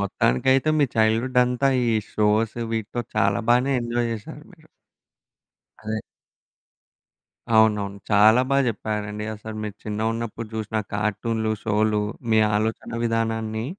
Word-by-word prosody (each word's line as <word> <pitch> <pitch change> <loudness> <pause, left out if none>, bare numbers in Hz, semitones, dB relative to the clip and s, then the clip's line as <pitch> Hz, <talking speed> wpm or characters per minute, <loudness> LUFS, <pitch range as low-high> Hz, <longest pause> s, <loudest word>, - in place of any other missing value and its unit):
మొత్తానికైతే 125 - +2
మీ 145 - +5
చైల్డ్‌హుడంతా 125 +4 +2 0.2
ఈ - - +2 0.2
షోసు 110 +2 +1
వీటితో 115 +2 -3
చాలా 100 +2 +2
బాగానే 125 +3 +3
ఎంజాయ్ 120 0 -1
జేసారు 110 -2 -8
మీరు. - - -20 1.2
అదే. 110 0 -2 1.5
అవునవును. 105 -2 +3
చాలా 110 +4 +6
బా 140 - +3
చెప్పారండి 105 -1 -3
అసలు 110 +1 -8
మీరు 105 -1 -5
చిన్నగున్నప్పుడు 110 +1 -3
జూషిన 110 0 -2
కార్టూన్లు, 110 +2 -1
షోలు 105 0 +1 0.3
మీ 110 - +5 0.2
ఆలోచనా 110 +2 -2
విధానాన్ని 110 -1 -1
110 Hz, 110 wpm, -23 LUFS, 105-115 Hz, 1.5 s, చాలా